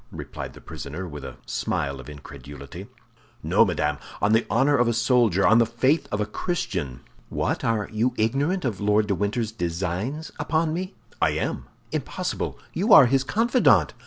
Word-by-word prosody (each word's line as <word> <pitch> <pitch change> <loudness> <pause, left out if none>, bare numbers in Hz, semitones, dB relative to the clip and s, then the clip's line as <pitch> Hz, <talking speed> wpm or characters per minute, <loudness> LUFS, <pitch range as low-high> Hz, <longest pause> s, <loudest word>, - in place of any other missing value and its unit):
replied - - -7
the - - -13
prisoner, 80 +7 -7
with 75 -4 -8
a - - -8
smile 70 +3 -2
of 65 - -10
incredulity. 70 -1 -10 0.6
"No, - - +4
madame, 75 -2 -1 0.2
on 105 - +2
the 115 +1 +3
honor 145 +2 +3
of 120 -2 +3
a 120 - +2
soldier, 115 -5 +3
on 110 +2 +6
the 115 - +5
faith 130 +7 +1
of 105 - -1
a 105 - +1
Christian." 90 - -3 0.3
"What, - - -1 0.3
you 110 +3 +1
are 125 - -4
ignorant 140 - 0
of 110 -5 -2
Lord 105 +1 +3
de 100 - 0
Winter's 105 +3 -1
designs 95 - -3
upon 160 0 0
me?" 185 +3 -4 0.3
"I - - +3
am." - - -3 0.3
"Impossible; - - -3 0.2
you 215 +4 0
are 145 - +10
his 135 +2 +2
confidant!" 235 - +3
110 Hz, 170 wpm, -24 LUFS, 85-135 Hz, 0.6 s, are